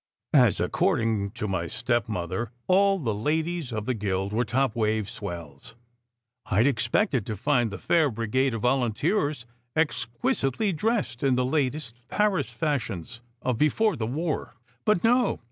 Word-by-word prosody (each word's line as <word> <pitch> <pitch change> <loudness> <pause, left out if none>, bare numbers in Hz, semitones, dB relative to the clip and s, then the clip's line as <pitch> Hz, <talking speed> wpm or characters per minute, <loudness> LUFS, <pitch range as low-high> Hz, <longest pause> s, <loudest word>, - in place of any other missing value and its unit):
As, - - +5
according 110 -4 +1
to 105 -3 -3
my 90 -4 -1
stepmother, 110 -1 -1 0.2
all 195 +1 +4
the 120 - -1
ladies 155 +6 -1
of 110 -2 -3
the 130 - 0
guild 100 -2 -2
were 120 +3 +2
"top 125 0 0
wave 110 -2 0
swells," 85 +2 -8 0.7
I 105 +2 +3
d 140 - +5
expected 125 - +1
to 110 - -2
find 120 +1 +1
the 100 - -6
fair 160 - +2
brigade 115 +3 0
of 110 - -5
volunteers 135 - +1 0.3
exquisitely 135 - 0
dressed 210 - -1
in 135 -2 +3
the 125 0 +1
latest 130 -3 -1
Paris 210 +4 +1
fashions 120 - -3 0.2
of 125 -3 0
"before 210 +8 +3
the 110 -2 -2
war." 155 +4 -3 0.3
But 210 -5 +3
no! 245 +2 +3
125 Hz, 145 wpm, -26 LUFS, 110-155 Hz, 0.7 s, As